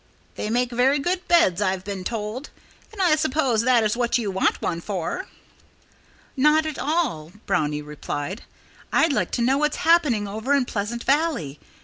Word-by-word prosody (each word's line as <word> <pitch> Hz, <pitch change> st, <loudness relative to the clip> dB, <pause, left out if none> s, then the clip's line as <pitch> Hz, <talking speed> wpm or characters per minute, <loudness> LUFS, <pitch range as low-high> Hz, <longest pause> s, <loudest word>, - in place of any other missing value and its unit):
"They 210 Hz, -, -4 dB
make 245 Hz, +2 st, 0 dB
very 255 Hz, +4 st, +3 dB
good 355 Hz, +5 st, -2 dB
beds, 210 Hz, -, +4 dB
I've 190 Hz, -2 st, 0 dB
been 195 Hz, -1 st, -5 dB
told. 225 Hz, +6 st, -4 dB, 0.4 s
And 435 Hz, -, -13 dB
I 350 Hz, -5 st, +4 dB
suppose 275 Hz, -6 st, +1 dB
that 240 Hz, -1 st, +3 dB
is 215 Hz, 0 st, +1 dB
what 240 Hz, 0 st, +1 dB
you 215 Hz, -5 st, -2 dB
want 190 Hz, -, +1 dB
one 170 Hz, -1 st, -2 dB
for." 200 Hz, -, -4 dB, 1.1 s
"Not 300 Hz, +3 st, +4 dB
at 310 Hz, -2 st, -4 dB
all!" 280 Hz, -, -1 dB
Brownie 150 Hz, -5 st, 0 dB
replied. 150 Hz, +5 st, -5 dB, 0.5 s
"I'd 320 Hz, -2 st, +3 dB
like -, -, 0 dB
to 240 Hz, -, 0 dB
know 265 Hz, +3 st, +2 dB
what's 300 Hz, 0 st, 0 dB
happening 300 Hz, -11 st, +3 dB
over 220 Hz, +8 st, 0 dB
in 275 Hz, -3 st, +2 dB
Pleasant 230 Hz, +2 st, -4 dB
Valley. 275 Hz, -, 0 dB
240 Hz, 165 wpm, -23 LUFS, 200-300 Hz, 1.1 s, beds